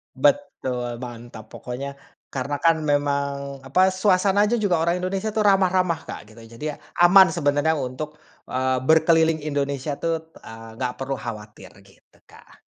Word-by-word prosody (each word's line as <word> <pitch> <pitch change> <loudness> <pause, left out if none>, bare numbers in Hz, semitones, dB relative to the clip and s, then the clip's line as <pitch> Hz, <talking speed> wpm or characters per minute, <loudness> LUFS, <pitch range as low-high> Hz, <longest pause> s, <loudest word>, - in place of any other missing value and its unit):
Betul, 130 -5 0
mantap 120 -2 -9
pokoknya. 140 +3 -7 0.4
Karena, 140 +2 -2
kan, 160 +2 +2
memang, 140 -2 -1
apa, 185 +9 +2
suasana 195 +1 +3
aja 240 - +1
juga 190 -7 +1
orang 170 +2 +1
Indonesia 190 +3 -2
itu 215 0 -1
ramah-ramah, 185 -4 +2
Kak, 105 +1 -9
gitu. 115 - -14 0.2
Jadi, 150 - -7
ya, - - -10 0.2
aman 185 +2 +7
sebenarnya 155 0 +1
untuk 145 +3 -5 0.3
eee, 130 0 0
berkeliling 160 +2 +4
Indonesia, 140 -1 -2
tuh, 160 -1 -3
eee, 115 0 -11
nggak 125 -1 -2
perlu 135 +1 -3
khawatir, 105 -5 -8 0.2
gitu, 95 - -25
Kak. - - -19
145 Hz, 145 wpm, -23 LUFS, 130-175 Hz, 0.4 s, aman